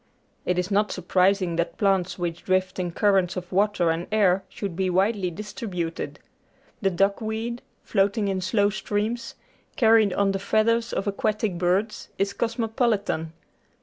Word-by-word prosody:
It 180 - +1
is 180 +2 -1
not 210 +1 +2
surprising 185 -1 +1
that 170 - -1
plants 195 -3 +1
which 170 -2 -4
drift 185 0 0
in 180 -1 -1
currents 190 -1 +2
of 180 0 -6
water 195 -3 +2
and 165 +2 -3
air 195 -3 +3
should 195 -5 -5
be 190 +1 0
widely 190 +1 +1
distributed. 180 -3 -5 0.6
The 195 - +3
duckweed, 220 +5 -1 0.2
float 200 0 +1
ing 210 -2 +1
in 190 -1 -1
slow 205 +2 +2
streams, 215 +3 -2 0.4
carried 220 -3 +5
on 200 0 +2
the 195 - -2
feathers 230 +3 +1
of - - -2
aquatic 205 -2 -1
birds, 190 +5 0
is 200 +1 0
cosmopolitan. 225 -8 -1
195 Hz, 150 wpm, -25 LUFS, 180-215 Hz, 0.6 s, carried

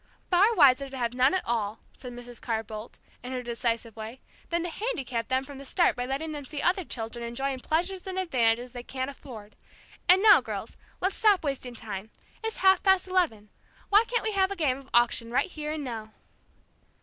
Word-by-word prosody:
"Far 400 +6 +5
wiser 275 -4 +5
to 265 - -7
have 240 -1 -1
none 255 +7 +3
at 375 - -1
all," 220 -2 -1 0.2
said 250 - -9
Mrs. 245 0 -8
Carr 225 -1 -1
Boldt, 215 +1 -9 0.2
in 250 +1 -6
her 250 -1 -3
decisive 230 -1 -2
way, 225 +3 -7 0.3
"than 340 0 0
to 350 - -3
handicap 265 - -3
them 260 0 +1
from 275 0 -10
the - - -8
start 345 +6 +2
by 245 0 -3
letting 285 +4 -3
them 295 -2 -5
see 285 +2 -6
other 370 +4 +2
children 235 -4 -5
enjoying 260 +3 -2
pleasures 355 +7 -1
and 375 0 -4
advantages 245 -8 +1
they 245 -1 -6
can't 260 +2 -4
afford. 225 -6 -11 0.5
And 375 +2 +7
now, 430 -2 +8
girls, - - -6 0.3
let's 380 +2 0
stop 420 -5 +4
wasting 265 -4 -3
time. 215 -2 -6 0.3
It's 445 0 -3
half 380 -1 +6
past 380 -1 +4
eleven. 325 - 0 0.4
Why 415 +2 +6
can't 475 -1 0
we 440 - 0
have 385 -2 +2
a 400 - -3
game 280 -7 0
of 270 -1 -16
auction 240 -1 +3
right 250 +9 +1
here 300 -1 -4
and 310 -2 -4
now?" 225 -4 -6
265 Hz, 205 wpm, -28 LUFS, 235-355 Hz, 0.5 s, now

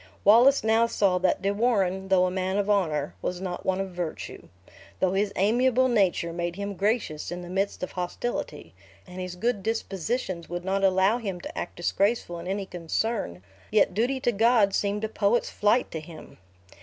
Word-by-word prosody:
Wallace 240 +7 +6
now 225 +1 +3
saw 195 -5 +1
that 185 +1 +1
De 200 +1 +1
Warenne, 195 -4 +1
though 185 -1 +4
a 180 - -1
man 190 +1 -1
of 205 0 +1
honor, 155 -8 0
was 180 - -3
not 180 -1 -5
one 190 0 +1
of 195 -1 -3
virtue. 175 -3 -6 0.5
Though 185 0 +2
his 200 +1 +1
amiable 245 +6 +3
nature 190 -7 +1
made 175 0 -3
him 200 +1 -4
gracious 200 -6 -1
in 175 0 -5
the 175 - -9
midst 195 0 -1
of - - -4
hostility, 240 - -4 0.3
and 180 0 -8
his 180 -1 -5
good 220 +2 -1
dispositions 195 -3 -3
would 175 +1 -5
not 195 +1 0
allow 190 +4 +3
him 195 -6 -4
to - - -8
act - - -5
disgracefull 185 0 0
in 170 - -8
any 195 +1 -2
concern, 175 - -3 0.3
yet 210 -3 +3
duty 245 +7 0
to 240 - +2
God 220 -2 +3
seemed 205 +2 -1
a - - +1
poet's 220 +2 +1
flight 210 +4 +2
to 160 - -4
him. 155 - -12
195 Hz, 185 wpm, -26 LUFS, 180-220 Hz, 0.5 s, Wallace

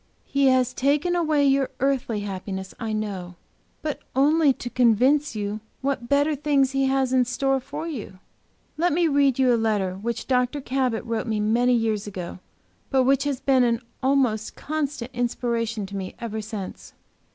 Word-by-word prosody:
"He 280 -1 +2
has 255 -1 +3
taken 295 +7 +1
away 310 -4 +2
your 270 -1 +3
earthly 265 -5 0
happiness, 190 -1 -5
I 225 -1 -3
know, 195 -5 -4 0.5
but 300 -2 -2 0.2
only 295 +2 +4
to 250 - -5
convince 250 +4 +3
you 205 0 -3 0.2
what 260 -3 -2
better 285 +2 +3
things 280 -2 +2
He 270 0 +1
has 265 -1 +1
in 255 -1 +5
store 270 +2 0
for 290 +5 -6
you. 230 - -6 0.6
Let 345 0 +2
me 340 +1 +3
read 280 -3 +3
you 255 -2 +4
a - - +4
letter 210 -5 0
which 225 +5 -4
Dr. 250 +2 +1
Cabot 255 -3 -1
wrote 230 +1 -2
me 220 -1 0
many 240 +4 +3
years 220 -3 0
ago, 185 -3 -6 0.5
but 265 -1 +3
which 270 +2 +2
has 280 -3 -1
been 265 -2 +4
an 235 -1 +2 0.2
almost 255 -5 +1
constant 285 -5 -3
inspiration 235 -3 -1
to 200 +1 -8
me 190 -1 -5
ever 220 -2 -4
since." 210 -3 -7
250 Hz, 170 wpm, -24 LUFS, 220-275 Hz, 0.6 s, in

